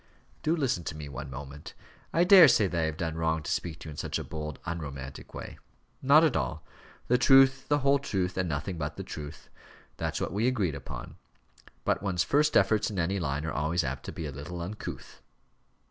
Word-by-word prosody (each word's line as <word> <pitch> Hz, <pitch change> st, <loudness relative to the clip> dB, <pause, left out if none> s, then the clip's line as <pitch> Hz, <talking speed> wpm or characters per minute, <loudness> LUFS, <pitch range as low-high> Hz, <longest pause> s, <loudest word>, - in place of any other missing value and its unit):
"Do 160 Hz, +2 st, +1 dB
listen 130 Hz, -, 0 dB
to 80 Hz, -, -4 dB
me 75 Hz, -1 st, -7 dB
one 70 Hz, +1 st, -7 dB
moment. 70 Hz, +2 st, -9 dB, 0.4 s
I 170 Hz, -, +3 dB
daresay 175 Hz, -, +8 dB
that 90 Hz, -3 st, -1 dB
I -, -, +1 dB
have 80 Hz, 0 st, -4 dB
done 80 Hz, -2 st, -2 dB
wrong 80 Hz, -1 st, 0 dB
to -, -, -4 dB
speak 85 Hz, -3 st, -2 dB
to -, -, -9 dB
you -, -, -6 dB
in 75 Hz, -, -10 dB
such -, -, -2 dB
a -, -, -4 dB
bold, 75 Hz, -2 st, -6 dB
unromantic 70 Hz, -5 st, -6 dB
way." -, -, -8 dB, 0.4 s
"Not 145 Hz, +4 st, +6 dB
at 155 Hz, -6 st, +3 dB
all. 75 Hz, -, -2 dB, 0.4 s
The 125 Hz, +1 st, +3 dB
truth, 135 Hz, 0 st, +5 dB
the 145 Hz, -, +3 dB
whole 140 Hz, 0 st, +5 dB
truth, 95 Hz, -9 st, -2 dB
and 90 Hz, -2 st, -1 dB
nothing 80 Hz, +4 st, -3 dB
but 75 Hz, 0 st, -4 dB
the -, -, -4 dB
truth. 75 Hz, 0 st, -9 dB, 0.5 s
That's -, -, -2 dB
what -, -, -3 dB
we 110 Hz, +4 st, +1 dB
agreed 105 Hz, -, +1 dB
upon. 65 Hz, -3 st, -8 dB, 0.7 s
But -, -, +1 dB
one's 95 Hz, -4 st, 0 dB
first 150 Hz, +1 st, +3 dB
efforts 105 Hz, +2 st, +3 dB
in 105 Hz, -, -6 dB
any 95 Hz, +3 st, 0 dB
line 75 Hz, -2 st, -2 dB
are 80 Hz, -, -3 dB
always 80 Hz, +4 st, 0 dB
apt 65 Hz, +1 st, -4 dB
to -, -, -5 dB
be 80 Hz, -, -6 dB
a 75 Hz, -, -4 dB
little 75 Hz, +6 st, -7 dB
uncouth." 105 Hz, +5 st, -7 dB
85 Hz, 210 wpm, -29 LUFS, 75-120 Hz, 0.7 s, daresay